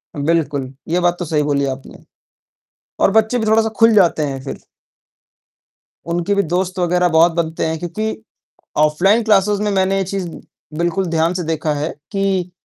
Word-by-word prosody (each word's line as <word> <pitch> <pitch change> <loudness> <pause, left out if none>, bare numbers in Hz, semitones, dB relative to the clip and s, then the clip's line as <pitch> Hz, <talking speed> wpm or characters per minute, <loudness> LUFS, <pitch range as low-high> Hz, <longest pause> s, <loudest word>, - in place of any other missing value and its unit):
बिल्कुल, 145 -3 -1
ये 175 +2 +1
बात 175 0 +2
तो 175 - -3
सही 150 -2 0
बोली 140 -1 0
आपने। 135 - -15 1.0
और - - +4
बच्चे 220 +3 +2
भी 220 - -1
थोड़ा-सा 220 +1 +3
खुल 225 0 +5
जाते 175 -6 +3
हैं 135 -1 -5
फ़िर 135 - -7 1.5
उनके 175 +4 0
भी 200 - +2
दोस्त 185 +2 -2
वगैरह 180 0 +2
बहुत 165 +1 +5
बनते 165 -1 -2
हैं। 160 0 -1
क्योंकि 215 +6 -3 0.6
ऑफलाइन 175 +9 +3
क्लासेज़ 205 -1 +2
में 210 0 0
मैंने 190 0 +1
ये 195 - +1
चीज़ 190 -2 -4 0.5
बिल्कुल 175 +3 0
ध्यान 165 +1 +1
से 180 -1 -3
देखा 160 -1 -1
है 150 +2 -2 0.2
कि 195 -3 -1
175 Hz, 165 wpm, -18 LUFS, 160-195 Hz, 1.5 s, खुल